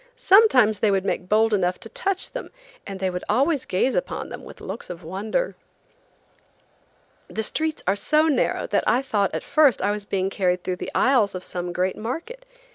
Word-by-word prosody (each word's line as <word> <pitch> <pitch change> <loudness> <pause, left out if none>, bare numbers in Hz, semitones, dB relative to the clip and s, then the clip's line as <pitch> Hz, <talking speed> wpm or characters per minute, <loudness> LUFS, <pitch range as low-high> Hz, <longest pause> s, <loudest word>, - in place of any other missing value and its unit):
Sometimes 380 - +5
they 215 - +3
would 195 -1 +1
make 180 -1 -2
bold 220 +1 +3
enough 180 -2 +1
to - - -9
touch 395 -7 -1
them, - - -6 0.4
and 195 -1 -6
they 190 -1 -1
would 180 0 -5
always 275 +5 +2
gaze 220 +8 0
upon - - -3
them - - -8
with - - -12
looks - - -7
of 175 0 -8
wonder. 205 - -2 1.7
The 220 - -3
streets 315 +7 -2
are 195 - +2
so 305 +9 +2
narrow 300 - +1
that - - 0
I 250 +3 +3
thought 205 -7 0
at - - -3
first 280 -6 +4
I 200 +2 +1
was 210 -1 -4
being 195 -1 -1
carried 180 -2 0
through 180 -1 -3
the - - -6
aisles 240 -8 +3
of 185 - -5
some 175 -1 -4
great 180 +2 -1
market. 335 - -6
215 Hz, 195 wpm, -23 LUFS, 190-305 Hz, 1.7 s, Sometimes